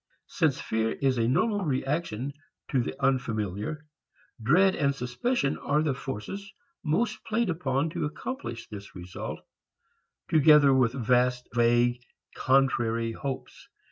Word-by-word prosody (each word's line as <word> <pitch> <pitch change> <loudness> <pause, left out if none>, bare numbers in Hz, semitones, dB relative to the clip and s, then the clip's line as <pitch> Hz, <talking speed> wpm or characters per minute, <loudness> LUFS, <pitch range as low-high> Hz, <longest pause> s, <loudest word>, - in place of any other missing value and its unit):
Since - - 0
fear 110 0 -1
is 135 -3 0
a 115 - +2
normal 200 - +1
reaction 140 -3 -2 0.4
to 130 - +3
the 125 - -5
unfamiliar, 115 - -1 0.6
dread 180 - +4
and 140 -1 +1
suspicion 135 - -1
are 150 +2 +1
the 150 -3 +1
forces 135 - -6 0.3
most 215 +8 0
played 220 -3 0
upon 150 -2 -1
to 170 -2 -2
accomplish 150 - -6
this 100 -1 -10
result, 90 0 -7 0.9
together 150 -2 +6
with 125 -3 +3
vast 125 0 +1
vague 120 +1 +3 0.3
contrary 120 -4 +2
hopes. 135 +3 -6
135 Hz, 120 wpm, -27 LUFS, 120-155 Hz, 0.9 s, together